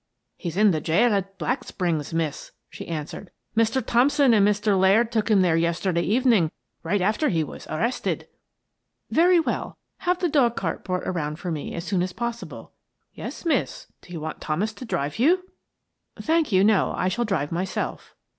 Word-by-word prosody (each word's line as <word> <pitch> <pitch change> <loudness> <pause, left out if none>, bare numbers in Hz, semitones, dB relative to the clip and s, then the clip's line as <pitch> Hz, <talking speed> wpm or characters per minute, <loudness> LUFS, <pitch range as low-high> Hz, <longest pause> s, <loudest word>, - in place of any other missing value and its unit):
" - - -54
He's 170 -1 -5
in 210 -1 +5
the 155 -3 -1
jail 210 +10 +3
at 195 -1 -2
Black 250 +9 -1
Springs, 165 -6 -2
miss," 165 -3 -3 0.2
she - - -9
answered. 165 +3 -6
" - - -47
Mr. 230 +4 +2
Thompson 270 +1 +4
and 205 -2 +5
Mr. 210 0 +2
Laird 195 +5 +4
took 220 -1 0
him 205 -3 +5
there 170 -3 +3
yesterday 170 +1 +1
evening 220 -4 +3 0.3
right 180 +4 0
after 215 +10 +1
he 165 -3 +1
was 150 - -9
arrested." 230 +11 -2 0.4
" - - -55 0.3
Very 350 +2 +5
well. 325 - -2 0.2
Have 360 -1 0
the 360 -1 0
dog 260 -7 +2
cart 165 -4 -3
brought 185 -1 -2
around 155 -5 -2
for 175 +2 -5
me 150 -3 -4
as 170 - -4
soon 190 -1 0
as 180 0 -2
possible." 235 0 -6 0.2
" - - -51
Yes, - - -8
miss. 330 - -1
Do - - -16
you 170 - -5
want 155 +1 -6
Thomas 190 +8 -1
to 255 - -9
drive 145 - -3
you?" 360 +8 +3 0.4
" - - -30
Thank 320 -4 +1
you, 190 0 +4
no. 210 -1 +3
I 185 - 0
shall 240 +6 0
drive 195 -10 -1
myself." 185 +3 -4
195 Hz, 195 wpm, -24 LUFS, 170-235 Hz, 0.4 s, in